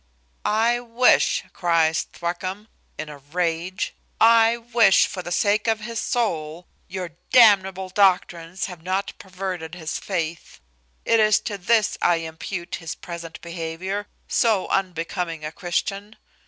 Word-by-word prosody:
"I 230 Hz, +3 st, +2 dB
wish," 245 Hz, +1 st, +3 dB
cries 165 Hz, -2 st, +1 dB
Thwackum, 185 Hz, +4 st, -4 dB, 0.3 s
in 155 Hz, -, -5 dB
a 150 Hz, -1 st, -10 dB
rage, 170 Hz, +4 st, -2 dB, 0.3 s
"I 230 Hz, 0 st, +6 dB
wish, 230 Hz, -4 st, +4 dB
for 185 Hz, -, -5 dB
the 175 Hz, 0 st, -7 dB
sake 205 Hz, +4 st, +2 dB
of 225 Hz, -1 st, +1 dB
his 230 Hz, +1 st, -4 dB
soul, 170 Hz, -8 st, -2 dB, 0.2 s
your 180 Hz, -2 st, -5 dB, 0.2 s
damnable 190 Hz, -5 st, +5 dB
doctrines 180 Hz, -2 st, +1 dB
have 180 Hz, -4 st, -9 dB
not 185 Hz, +3 st, -2 dB
perverted 185 Hz, -3 st, -5 dB
his 160 Hz, -3 st, -4 dB
faith. 170 Hz, -4 st, -4 dB, 0.5 s
It 230 Hz, -, +4 dB
is 215 Hz, -1 st, +5 dB
to 205 Hz, -, -4 dB
this 220 Hz, +3 st, +2 dB
I 175 Hz, -, +4 dB
impute 165 Hz, +2 st, -5 dB
his 165 Hz, -2 st, -6 dB
present 170 Hz, -1 st, -8 dB
behaviour, 170 Hz, +4 st, -4 dB, 0.2 s
so 220 Hz, -6 st, +2 dB
unbecoming 170 Hz, -3 st, -2 dB
a 155 Hz, -, -4 dB
Christian. 195 Hz, +5 st, -3 dB
185 Hz, 130 wpm, -23 LUFS, 165-210 Hz, 0.5 s, I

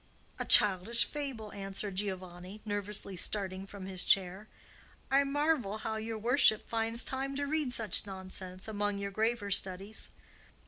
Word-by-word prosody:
"A -, -, -2 dB
childish 205 Hz, +3 st, +7 dB
fable," 265 Hz, -8 st, -6 dB
answered 195 Hz, 0 st, -5 dB
Giovanni, 185 Hz, 0 st, -5 dB
nervously 205 Hz, -1 st, -1 dB
starting 190 Hz, +1 st, 0 dB
from 200 Hz, -2 st, -9 dB
his 190 Hz, -1 st, -1 dB
chair. 190 Hz, +2 st, +1 dB, 0.6 s
"I 275 Hz, +1 st, +5 dB
marvel 280 Hz, -6 st, 0 dB
how 220 Hz, 0 st, -4 dB
your 220 Hz, +1 st, -4 dB
worship 235 Hz, 0 st, +3 dB
finds 230 Hz, +1 st, -1 dB
time 270 Hz, +1 st, -4 dB
to 285 Hz, +1 st, -2 dB
read 300 Hz, -2 st, -1 dB
such 220 Hz, -3 st, 0 dB
nonsense 185 Hz, -1 st, -7 dB
among 205 Hz, -1 st, -2 dB
your 200 Hz, 0 st, -4 dB
graver 220 Hz, 0 st, -1 dB
studies." 195 Hz, +2 st, 0 dB
205 Hz, 140 wpm, -32 LUFS, 195-235 Hz, 0.6 s, childish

